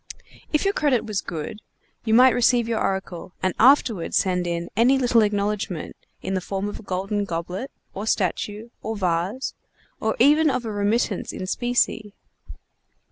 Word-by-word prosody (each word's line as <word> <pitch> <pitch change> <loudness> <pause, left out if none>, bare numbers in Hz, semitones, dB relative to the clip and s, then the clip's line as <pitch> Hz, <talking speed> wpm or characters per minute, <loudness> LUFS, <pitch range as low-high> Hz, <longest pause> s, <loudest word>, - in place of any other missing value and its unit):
If 300 +4 +1
your 395 - +2
credit 280 - +1
was 210 -3 -2
good, 165 +5 -6 0.5
you 220 -1 +3
might 255 +1 +7
receive 240 -1 +3
your 230 -1 -1
oracle 190 -2 -3
and 185 -1 +1
afterward 235 -8 +4
send 180 -2 +1
in 170 0 -3
any 245 +5 +4
little 245 -3 +3
acknowledgment 205 -4 -1 0.3
in 190 - -2
the 185 - 0
form 195 +2 -3
of 205 - -6
a - - -10
golden 195 +1 -2
goblet, 180 +7 -4 0.2
or 205 +3 -5
statue, 210 +3 -1
or 220 +1 -4
vase, 185 +7 -1 0.5
or 220 0 0
even 300 +5 +5
of 255 -3 -1
a 220 - -3
remittance 205 0 0
in 185 - -5
specie. 225 -1 0
210 Hz, 160 wpm, -23 LUFS, 190-240 Hz, 0.5 s, might